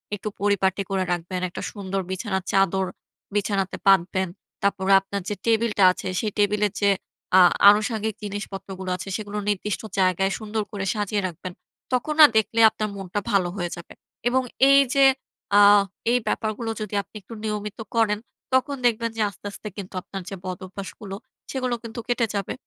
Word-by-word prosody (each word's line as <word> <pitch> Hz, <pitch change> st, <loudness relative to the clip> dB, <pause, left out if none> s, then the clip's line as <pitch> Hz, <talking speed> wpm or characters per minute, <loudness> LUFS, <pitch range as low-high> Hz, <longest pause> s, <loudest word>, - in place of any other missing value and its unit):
একটু 205 Hz, -, -7 dB
পরিপাটি 195 Hz, -1 st, +1 dB
করে 190 Hz, -1 st, 0 dB
রাখবেন, 175 Hz, +1 st, -2 dB
একটা -, -, -7 dB
সুন্দর 195 Hz, -2 st, -3 dB
বিছানার 190 Hz, 0 st, -2 dB
চাদর 190 Hz, -1 st, +2 dB, 0.5 s
বিছানাতে 200 Hz, -2 st, 0 dB
পাতবেন। 190 Hz, 0 st, +4 dB, 0.4 s
তারপরে, 195 Hz, -1 st, +1 dB
আপনার 200 Hz, +1 st, -5 dB
যে 210 Hz, -, -2 dB
টেবিলটা 225 Hz, -3 st, +2 dB
আছে, -, -, -6 dB
সেই 215 Hz, -2 st, -1 dB
টেবিলের 205 Hz, 0 st, +2 dB
যে 200 Hz, -, +4 dB, 0.5 s
আ -, -, +9 dB, 0.3 s
আনুষঙ্গিক 215 Hz, 0 st, +1 dB
জিনিসপত্রগুলো 195 Hz, -2 st, -6 dB
আছে, 185 Hz, -, -8 dB
সেগুলো 210 Hz, -1 st, -6 dB
নির্দিষ্ট 205 Hz, 0 st, -1 dB, 0.2 s
জায়গায় 190 Hz, +1 st, +2 dB
সুন্দর 215 Hz, 0 st, -3 dB
করে 200 Hz, -2 st, -4 dB
সাজিয়ে 205 Hz, -1 st, -1 dB
রাখবেন। 180 Hz, +1 st, -8 dB, 0.4 s
তখন 255 Hz, +5 st, 0 dB
না, 310 Hz, -, +12 dB
দেখলে 220 Hz, +1 st, +1 dB
আপনার 215 Hz, 0 st, -3 dB
মনটা 195 Hz, 0 st, -3 dB
ভালো 185 Hz, -3 st, +2 dB
হয়ে 175 Hz, -2 st, -2 dB
যাবে। 170 Hz, -, -11 dB, 0.4 s
এবং 260 Hz, +1 st, +2 dB, 0.3 s
এইযে 275 Hz, 0 st, +5 dB, 0.5 s
আ 205 Hz, -, +8 dB, 0.5 s
এই 245 Hz, -, +4 dB
ব্যাপারগুলো 220 Hz, +1 st, -2 dB
যদি 210 Hz, -1 st, -5 dB
আপনি 200 Hz, -, -24 dB
একটু 230 Hz, -, -12 dB
নিয়মিত 210 Hz, 0 st, -4 dB, 0.2 s
করেন, 215 Hz, -2 st, +2 dB, 0.3 s
তখন 260 Hz, +2 st, +2 dB
দেখবেন 230 Hz, -1 st, +2 dB
যে, -, -, 0 dB
আস্তে, 200 Hz, -, -17 dB
আস্তে 210 Hz, -, -9 dB
কিন্তু 195 Hz, -2 st, -7 dB
আপনার 195 Hz, +1 st, -7 dB
যে 195 Hz, -, -5 dB
বদভ্যাসগুলো, 190 Hz, +2 st, -7 dB, 0.4 s
সেগুলো 255 Hz, -2 st, -1 dB
কিন্তু 230 Hz, 0 st, -7 dB
কেটে 245 Hz, -1 st, +1 dB
যাবে। 200 Hz, -1 st, -2 dB
205 Hz, 160 wpm, -24 LUFS, 190-220 Hz, 0.5 s, না